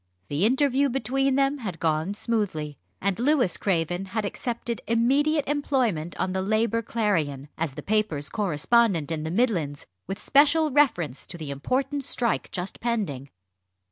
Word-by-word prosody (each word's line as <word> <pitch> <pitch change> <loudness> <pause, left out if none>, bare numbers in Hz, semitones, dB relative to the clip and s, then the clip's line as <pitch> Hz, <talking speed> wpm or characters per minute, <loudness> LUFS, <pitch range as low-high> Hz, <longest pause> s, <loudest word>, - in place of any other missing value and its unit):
The 150 +7 +1
interview 275 +2 +2
between 270 +1 0
them 275 +1 +2
had 190 -9 -5
gone 160 +4 0
smoothly, 200 -11 -2 0.2
and 200 0 -1
Louis 255 - +2
Craven 175 0 0
had 210 +3 -3
accepted 235 +2 -4
immediate 275 +6 +2
employment 255 - 0
on 185 - 0
the 190 - 0
Labour 220 +3 +1
Clarion, 160 - -1
as 160 -4 -3
the - - -7
paper's 205 -9 0
correspondent 195 -1 +1
in 160 -1 -2
the 160 - -3
Midlands, 175 - 0 0.2
with 195 - -3
special 295 +2 +4
reference 175 - +1
to - - -7
the 155 -4 -6
important 265 - -1
strike 240 -2 0
just 180 +1 -5
pending. 195 - -2
215 Hz, 145 wpm, -26 LUFS, 165-255 Hz, 0.2 s, special